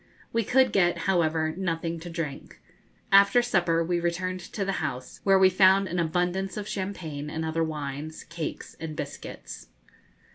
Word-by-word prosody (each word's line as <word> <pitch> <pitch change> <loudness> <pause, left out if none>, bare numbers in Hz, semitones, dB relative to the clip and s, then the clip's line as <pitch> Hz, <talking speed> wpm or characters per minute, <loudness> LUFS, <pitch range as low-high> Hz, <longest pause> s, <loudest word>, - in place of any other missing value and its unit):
We 230 0 +2
could 260 +2 +3
get 175 -3 +3
however, 160 -4 +1
nothing 170 -2 -2
to 175 +2 -8
drink. 165 -5 -6 0.5
After 200 +5 +6
supper, 175 -8 +2
we 175 +1 0
returned 180 +2 -1
to 195 +2 -4
the 195 - 0
house, 125 0 -5
where 195 -1 +5
we 190 0 +7
found 190 +1 +5
an 180 0 -2
abundance 180 +4 0
of 210 -1 -4
champagne 170 -8 -4
and 160 +1 -3
other 160 +1 0
wines, 150 0 -5
cakes, 170 -2 -6
and 160 -1 -5
biscuits. - - -7
175 Hz, 155 wpm, -27 LUFS, 160-190 Hz, 0.5 s, we